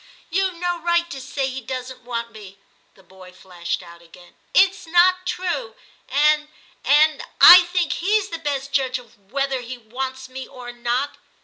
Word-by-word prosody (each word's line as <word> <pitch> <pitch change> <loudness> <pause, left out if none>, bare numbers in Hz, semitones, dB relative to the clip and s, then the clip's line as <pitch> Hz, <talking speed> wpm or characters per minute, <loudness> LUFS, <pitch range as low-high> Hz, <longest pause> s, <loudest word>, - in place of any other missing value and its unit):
* - - -30
You've 380 +1 0
no 350 0 -2
right 345 0 +1
to 270 - -7
say 275 +1 -3
he 265 0 -5
doesn't 255 +1 -7
want 235 -1 -5
me,' 200 -3 -13 0.4
the 190 - -21
boy 185 0 -15
flashed 180 -1 -6
out 170 -1 -14
again; 175 +1 -18
' - - -39
it's 385 -2 +3
not 365 +2 +3
true; 290 -13 -3 0.3
and 300 +2 +3 0.2
— - - -35
and 305 +1 +3
— - - -38 0.2
I 350 - -1
think 350 -2 -1
he's 415 +3 0
the 330 - -6
best 280 -3 -3
judge 265 -2 0
of 220 -5 -19
whether 275 -1 -1
he 245 +1 -8
wants 260 +3 -6
me 260 0 -8
or 245 -1 -10
not.' 240 +3 -2
265 Hz, 190 wpm, -22 LUFS, 235-335 Hz, 0.4 s, it's